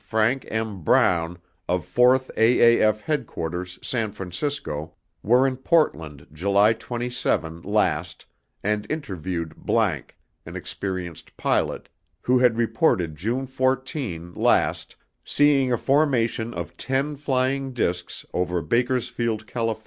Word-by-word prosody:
FRANK 110 Hz, +4 st, +1 dB
M. 110 Hz, -4 st, -3 dB
BROWN 85 Hz, +2 st, +2 dB, 0.3 s
OF 90 Hz, -3 st, 0 dB
FOURTH 130 Hz, +1 st, +3 dB
AAF 115 Hz, -2 st, +4 dB
HEADQUARTERS 90 Hz, -, -3 dB
SAN 115 Hz, -4 st, -1 dB
FRANCISCO 90 Hz, -, -4 dB, 0.3 s
WERE 125 Hz, +4 st, +4 dB
IN 130 Hz, -1 st, 0 dB
PORTLAND 85 Hz, -, 0 dB
JULY 100 Hz, +6 st, +3 dB
TWENTY 120 Hz, +2 st, -5 dB
SEVEN 85 Hz, -8 st, -1 dB
LAST 90 Hz, -5 st, -1 dB, 0.4 s
AND 105 Hz, 0 st, -1 dB
INTERVIEWED 95 Hz, -, -3 dB, 0.2 s
____ -, -, +2 dB, 0.4 s
AN -, -, -8 dB
EXPERIENCED 90 Hz, -4 st, -5 dB
PILOT, -, -, 0 dB, 0.3 s
WHO 125 Hz, 0 st, +3 dB
HAD 125 Hz, -2 st, +4 dB
REPORTED 110 Hz, -, +1 dB
JUNE 115 Hz, -, -2 dB
FOURTEEN 130 Hz, -, -2 dB
LAST -, -, +1 dB, 0.3 s
SEEING 140 Hz, -3 st, +3 dB
A 120 Hz, -, +2 dB
FORMATION 120 Hz, -5 st, +1 dB
OF -, -, -6 dB
TEN 135 Hz, +3 st, -1 dB
FLYING 135 Hz, -1 st, 0 dB
DISCS 90 Hz, -8 st, -2 dB
OVER 90 Hz, -1 st, -1 dB
BAKERSFIELD, 115 Hz, +2 st, 0 dB
CALIF. 115 Hz, -1 st, -2 dB
115 Hz, 115 wpm, -24 LUFS, 90-130 Hz, 0.4 s, AAF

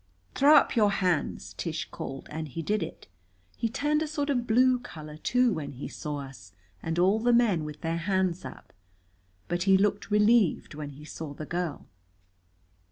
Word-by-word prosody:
"Throw 290 Hz, +3 st, +6 dB
up -, -, +4 dB
your 215 Hz, -3 st, +4 dB
hands!" 180 Hz, -5 st, -1 dB
Tish -, -, -3 dB
called. 135 Hz, 0 st, -7 dB
And 155 Hz, 0 st, -4 dB
he 165 Hz, +4 st, -5 dB
did 210 Hz, +4 st, 0 dB
it. 165 Hz, -, -6 dB, 0.5 s
He 230 Hz, -, -1 dB
turned 295 Hz, +6 st, 0 dB
a 315 Hz, -, -1 dB
sort 295 Hz, -2 st, -1 dB
of 245 Hz, -3 st, -1 dB
blue 250 Hz, +2 st, +4 dB
color, 155 Hz, -10 st, -9 dB
too, 250 Hz, +8 st, +2 dB
when 145 Hz, -3 st, -5 dB
he 130 Hz, -, -6 dB
saw 150 Hz, -1 st, -5 dB
us, 125 Hz, -10 st, -11 dB, 0.3 s
and 165 Hz, +1 st, -3 dB
all 190 Hz, +5 st, +4 dB
the 240 Hz, +2 st, +2 dB
men 220 Hz, -10 st, +3 dB
with 150 Hz, -1 st, -8 dB
their 165 Hz, 0 st, -1 dB
hands 185 Hz, 0 st, 0 dB
up. 130 Hz, -, -10 dB, 0.7 s
But 175 Hz, 0 st, -1 dB
he 190 Hz, -, +7 dB
looked 205 Hz, +1 st, 0 dB
relieved 210 Hz, -3 st, +3 dB
when 145 Hz, -1 st, -6 dB
he 145 Hz, +1 st, -12 dB
saw 155 Hz, -2 st, -7 dB
the 155 Hz, -, -6 dB
girl. 170 Hz, -2 st, -3 dB
180 Hz, 180 wpm, -28 LUFS, 155-230 Hz, 0.7 s, he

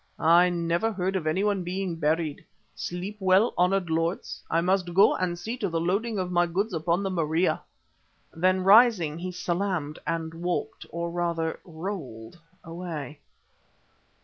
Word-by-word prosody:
I 175 Hz, +2 st, +6 dB
never 170 Hz, +5 st, 0 dB
heard 190 Hz, -1 st, -2 dB
of 170 Hz, -4 st, -1 dB
anyone 195 Hz, +3 st, +1 dB
being 180 Hz, 0 st, -3 dB
buried. 160 Hz, -1 st, -1 dB, 0.3 s
Sleep 185 Hz, +4 st, -5 dB
well, 190 Hz, +4 st, +3 dB
honoured 180 Hz, -1 st, +1 dB
lords, 165 Hz, +3 st, -2 dB
I 165 Hz, -, +2 dB
must 180 Hz, 0 st, 0 dB
go 195 Hz, -, +6 dB
and 180 Hz, -2 st, -1 dB
see 220 Hz, +7 st, -4 dB
to 200 Hz, -5 st, -2 dB
the 165 Hz, -1 st, -1 dB
loading 200 Hz, +6 st, -1 dB
of 180 Hz, -1 st, -2 dB
my 175 Hz, 0 st, +3 dB
goods 195 Hz, +5 st, -1 dB
upon 170 Hz, +3 st, 0 dB
the 195 Hz, -, -1 dB
Maria." 165 Hz, 0 st, +1 dB, 0.7 s
Then 185 Hz, +3 st, +2 dB
rising, 195 Hz, -7 st, +5 dB
he 180 Hz, +1 st, -4 dB
salaamed 175 Hz, -4 st, -2 dB
and 165 Hz, 0 st, -2 dB
walked, 175 Hz, +2 st, -3 dB
or 170 Hz, 0 st, -4 dB
rather 170 Hz, -2 st, -1 dB
rolled, 160 Hz, -, -7 dB, 0.2 s
away. 165 Hz, -4 st, -6 dB
175 Hz, 150 wpm, -26 LUFS, 165-190 Hz, 0.7 s, I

